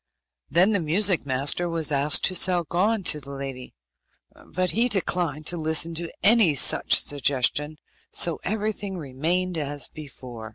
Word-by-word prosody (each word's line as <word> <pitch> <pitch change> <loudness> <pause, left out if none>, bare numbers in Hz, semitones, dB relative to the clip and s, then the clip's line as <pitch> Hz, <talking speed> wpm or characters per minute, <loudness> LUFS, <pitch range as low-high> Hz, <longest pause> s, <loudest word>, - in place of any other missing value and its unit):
Then 185 +5 +3
the 205 - +1
music 175 +1 +1
master 140 +6 0
was 165 -2 -1
asked 145 +3 +2
to 185 - +2
sell 180 -1 +2
Gon 195 +6 -1
to 150 - +3
the 140 - -12
lady, 135 - -8 0.7
but 185 +1 0
he 240 +3 +1
declined 175 - -1
to 175 - +1
listen 160 +1 +1
to 165 +1 -5
any 205 -6 +4
such - - +4
suggestion, 145 +2 -1 0.4
so 170 -3 0
everything 205 -2 -3
remained 165 +5 -2
as 145 -1 -3
before. 125 -6 -10
165 Hz, 150 wpm, -24 LUFS, 145-185 Hz, 0.7 s, any